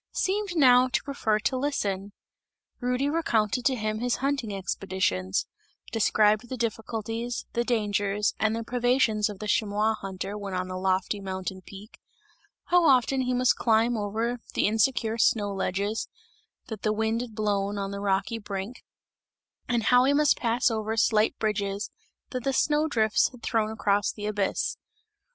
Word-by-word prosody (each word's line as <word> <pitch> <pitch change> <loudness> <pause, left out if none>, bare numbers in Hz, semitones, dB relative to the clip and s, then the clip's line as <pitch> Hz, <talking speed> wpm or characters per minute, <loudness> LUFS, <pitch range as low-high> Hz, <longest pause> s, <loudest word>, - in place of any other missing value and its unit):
seemed 395 -1 -1
now 255 -4 +6
to 255 - -1
prefer 250 -7 0
to 235 +5 -1
listen. 205 -8 -2 0.7
Rudy 250 +2 0
recounted 245 -7 0
to 265 - +3
him 215 -2 -2
his 245 +1 0
hunting 270 -5 -1
expeditions; 190 - -1 0.5
described 215 +1 +2
the 255 - -4
difficulties, 225 +1 -3
the 235 - +1
dangers 205 -3 0
and 220 +1 +1
the 230 - -3
privations 240 -3 +1
of 205 - -7
the 210 - -6
chamois 215 -1 +1
hunter 195 0 -5
when 200 -2 -5
on 185 0 -2
the 185 - -4
lofty 190 +2 0
mountain 190 -1 -5
peak; 200 +4 -13 0.7
how 355 0 +5
often 265 -2 +4
he 255 0 0
must 250 0 +3
climb 230 +1 +2
over 225 +3 -2 0.2
the - - +2
insecure 225 +1 +1
snow 205 -3 +2
ledges, 200 +3 -2 0.6
that 220 -4 -7
the 215 - +1
wind 220 +2 0
had 235 -3 -7
blown 205 -1 -1
on 195 0 -3
the 200 - -5
rocky 200 +3 0
brink, 200 +3 -6 0.9
and 240 -2 +1
how 250 +4 +5
he 280 - +3
must 295 0 +4
pass 240 +1 +1
over 220 0 -2
slight 220 0 +3
bridges 205 -1 -2 0.4
that 255 -2 -4
the 270 - 0
snow 300 +3 +2
drifts 220 -7 +2
had 250 -3 -16
thrown 220 -2 0
across 205 -2 +1
the 210 - -7
abyss. 205 -2 -1
220 Hz, 160 wpm, -27 LUFS, 205-245 Hz, 0.9 s, now